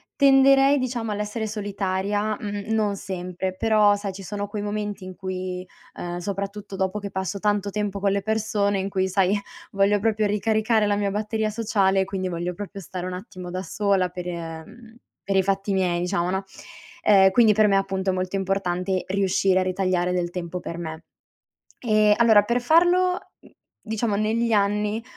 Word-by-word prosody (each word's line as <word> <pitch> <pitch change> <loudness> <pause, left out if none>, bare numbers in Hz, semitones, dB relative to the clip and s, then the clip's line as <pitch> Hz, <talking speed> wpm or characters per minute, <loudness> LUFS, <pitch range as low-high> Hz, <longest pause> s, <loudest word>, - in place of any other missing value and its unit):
tenderei 275 0 +5
diciamo 240 -4 -2
all'essere 210 +2 -3
solitaria, 205 0 -2
mhmm, 205 0 -5
non 210 -2 +1
sempre; 185 -1 -5
però 210 -2 +4
sai 200 -1 -5
ci 195 +1 -9
sono 205 +1 -4
quei 205 0 -5
momenti 205 -1 -4
in 185 0 -8
cui, 185 -1 -5 0.3
ehm, 175 0 -4
soprattutto 200 +1 -5
dopo 190 +2 -1
che 200 -1 -6
passo 190 +1 -3
tanto 205 0 0
tempo 205 -1 -2
con 195 0 +1
le 200 - 0
persone, 205 -1 0
in 190 - -2
cui 190 -1 -1
sai 195 +1 +2 0.3
voglio 200 +1 +2
proprio 215 0 +1
ricaricare 215 +1 +1
la 205 - +2
mia 205 -1 0
batteria 215 +1 -1
sociale, 200 -3 +1
quindi 190 -1 -3
voglio 175 +1 -3
proprio 200 +2 -7
stare 185 -1 -6
un 185 - -4
attimo 180 -1 -8
da 185 +1 -4
sola 195 -2 +1
per, 180 0 -7
ehm 170 +8 -8 0.3
per 195 - +1
i 190 - +4
fatti 195 +1 -1
miei 180 -2 +1
diciamo, 180 0 -1
no. 190 +1 -1 0.6
Ehm, 195 -2 +6
quindi 225 +1 +5
per 215 +1 +4
me 200 - +3
appunto 195 -1 0
è - - -2
molto 185 +1 -2
importante 190 -1 -1
riuscire 190 -1 +2
a - - +1
ritagliare 185 -1 0
del 175 -1 -1
tempo 180 0 -5
per 170 - -6
me. 160 -1 -6 0.8
Ehm, 215 -3 +4
allora 220 -3 +6
per 235 +4 0
farlo, 355 +6 +4 0.2
mhmm, - - -19 0.3
diciamo 220 -1 -1
negli 225 +3 0
anni 210 +1 +1
200 Hz, 175 wpm, -24 LUFS, 185-215 Hz, 0.8 s, Ehm